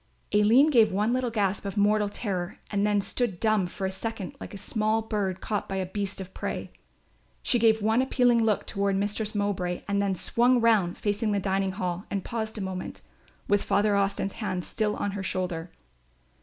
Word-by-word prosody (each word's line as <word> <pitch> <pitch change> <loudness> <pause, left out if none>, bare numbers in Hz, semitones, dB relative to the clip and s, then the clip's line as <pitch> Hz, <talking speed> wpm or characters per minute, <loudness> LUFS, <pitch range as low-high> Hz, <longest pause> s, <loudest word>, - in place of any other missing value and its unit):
Aline 230 +9 +5
gave 230 -5 +5
one 210 +5 +1
little 255 -1 0
gasp 205 -4 0
of 200 +1 -5
mortal 210 0 +3
terror 190 -4 -3
and 200 -1 +1
then 205 -1 +2
stood 200 -2 -2
dumb 215 -4 +2
for 190 +2 -5
a 190 - -1
second 200 0 -5
like - - -8
a 200 - -7
small 215 +2 0
bird 200 -4 -2
caught 210 -2 -2
by 195 - -2
a 190 -1 -1
beast 200 +1 -3
of 190 -1 -7
prey. - - -4 0.7
She 245 - +2
gave 220 -1 +4
one 220 +3 +3
appealing 245 -3 +3
look 215 -2 +1
toward 200 0 0
Mistress 210 +2 -1
Mowbray 185 -4 -1
and 200 0 +1
then 195 -1 0
swung 245 +7 +2
round 215 -7 +3
facing 210 +1 0
the 200 - +1
dining 195 0 0
hall 180 -1 -3
and 200 -2 -3
paused 220 -2 -4
a - - -3
moment, 190 -1 -5 0.4
with 205 0 +3
Father 205 0 +2
Austin's 195 0 0
hand 185 -4 -2
still 210 +1 -1
on 205 - -2
her 200 0 -4
shoulder. 180 -3 -3
205 Hz, 195 wpm, -27 LUFS, 190-220 Hz, 0.7 s, Aline